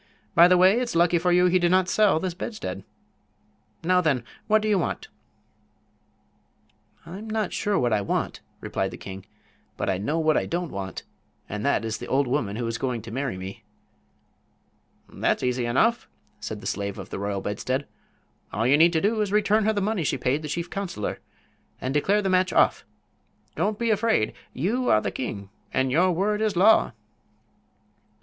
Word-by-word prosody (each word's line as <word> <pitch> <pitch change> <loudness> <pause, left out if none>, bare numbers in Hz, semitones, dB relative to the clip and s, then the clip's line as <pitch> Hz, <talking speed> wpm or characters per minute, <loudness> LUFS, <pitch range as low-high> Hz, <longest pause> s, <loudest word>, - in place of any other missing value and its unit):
By 170 +1 +8
the 180 0 +5
way, 190 +6 +5
it's 245 -5 -3
lucky 170 0 +4
for 180 +1 +1
you 180 +1 +5
he 180 +1 +4
did 175 -1 +2
not 185 0 +3
sell 210 -6 +3
this 185 0 -3
bedstead. 215 +5 -6 1.0
Now, 180 +2 +3
then, 140 -8 +1 0.2
what 215 0 +3
do - - 0
you 205 -3 +3
want?" - - -3 2.0
"I'm 195 +6 -8
not 215 -3 -1
sure 205 -1 0
what 120 -2 +1
I 105 - +2
want," 100 - -2 0.2
replied - - -2
the - - -9
king; 95 0 -9 0.5
"but - - 0
I 95 - -2
know 145 +11 -1
what 155 -1 +2
I - - -1
don't 175 -1 -3
want, 95 -1 -6 0.4
and 105 +1 -5
that 140 - +1
is 110 0 -3
the - - -7
old 140 +2 +2
woman 120 -6 -1
who 120 +1 -3
is 115 0 -3
going 125 -4 -2
to 115 - -9
marry 135 -4 -3
me." 95 +4 -8 1.4
"That's - - -1
easy 125 -1 0
enough," 225 - +2 0.3
said 105 -1 -6
the - - -11
Slave 100 -1 -3
of - - -9
the - - -4
Royal 100 0 -2
Bedstead. 130 +8 -2 0.7
"All 110 +2 -1
you 140 +4 +4
need 170 +2 +6
do 215 +4 +1
is 210 - 0
to 205 - 0
return 210 0 +3
her 220 - +2
the 205 - -1
money 205 -3 0
she - - 0
paid 140 +4 0
the 155 - -6
chief 170 +3 -3
counselor 185 - -4 0.6
and 130 +1 -3
declare 200 +8 +2
the - - 0
match 185 -1 +2
off. - - +3 0.7
Don't 205 +6 0
be 235 0 0
afraid. 210 - +1 0.2
You 225 - -1
are 110 - +5
the - - -3
king, 100 -6 -5 0.2
and 130 0 0
your 180 +6 +3
word 205 +5 0
is 215 -3 0
law." 195 - +5
170 Hz, 190 wpm, -25 LUFS, 120-200 Hz, 2.0 s, By